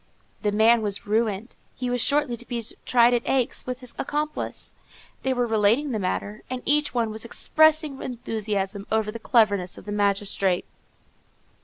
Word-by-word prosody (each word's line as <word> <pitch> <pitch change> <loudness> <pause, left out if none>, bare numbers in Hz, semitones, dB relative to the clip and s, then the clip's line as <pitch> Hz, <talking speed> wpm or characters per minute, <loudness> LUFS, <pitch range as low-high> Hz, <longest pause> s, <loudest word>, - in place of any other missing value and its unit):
The 210 - +1
man 225 +2 +5
was 205 -2 -2
ruined. 215 +1 -1 0.2
He 250 - -4
was 245 -1 0
shortly 285 -3 +2
to 240 +1 -9
be 235 -2 -3 0.2
tried 240 0 +5
at 240 - +2
Aix 255 -2 0
with 250 0 -4
his 250 -2 -8
accomplice. 300 +2 -3 0.5
They 265 - 0
were 245 -1 +1
relating 225 +6 +2
the 220 - -1
matter, 205 +2 -3
and 255 -1 -4
each 295 +1 +2
one 230 -3 0
was 220 +1 -5
expressing 310 +3 +3
enthusiasm 210 -5 -3
over 220 -1 +1
the 230 - -7
cleverness 205 -6 +2
of - - -12
the 205 - -5
magistrate. 200 -2 0
230 Hz, 165 wpm, -25 LUFS, 210-255 Hz, 0.5 s, man